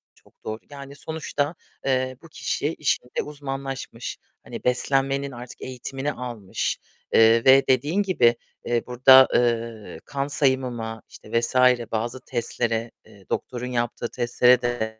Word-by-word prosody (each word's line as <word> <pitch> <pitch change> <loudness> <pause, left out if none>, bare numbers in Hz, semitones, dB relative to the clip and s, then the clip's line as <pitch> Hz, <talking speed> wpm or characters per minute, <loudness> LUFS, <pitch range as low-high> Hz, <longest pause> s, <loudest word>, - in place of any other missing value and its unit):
çok - - -27
doğru; 110 +1 -4
yani 140 0 -10
sonuçta, 155 0 -3 0.3
eee, 130 -1 0
bu 165 - -13
kişi 150 +1 -2
işinde 125 -4 -1
uzmanlaşmış, 135 -4 -6 0.3
hani - - -8
beslenmenin 135 +2 +2
artık 120 0 -10
eğitimini 135 +2 -4
almış, 120 -7 -3 0.4
eee, 115 +2 +5
ve 135 +1 +7
dediğin 150 +10 +2
gibi, 120 -12 +3 0.3
eee, 120 -1 0
burada, 130 +2 +7
eee, 115 -2 -1
kan 140 -1 -3
sayımıma, 125 -6 0
işte 115 +2 -2
vs. 120 - -1 0.4
bazı 115 +3 -2
testlere, 115 -2 -1
eee, 100 -3 -18
doktorun 125 0 -3
yaptığı 120 -1 -2
testlere 125 0 +3
de 110 -3 -3
125 Hz, 130 wpm, -24 LUFS, 115-135 Hz, 0.4 s, ve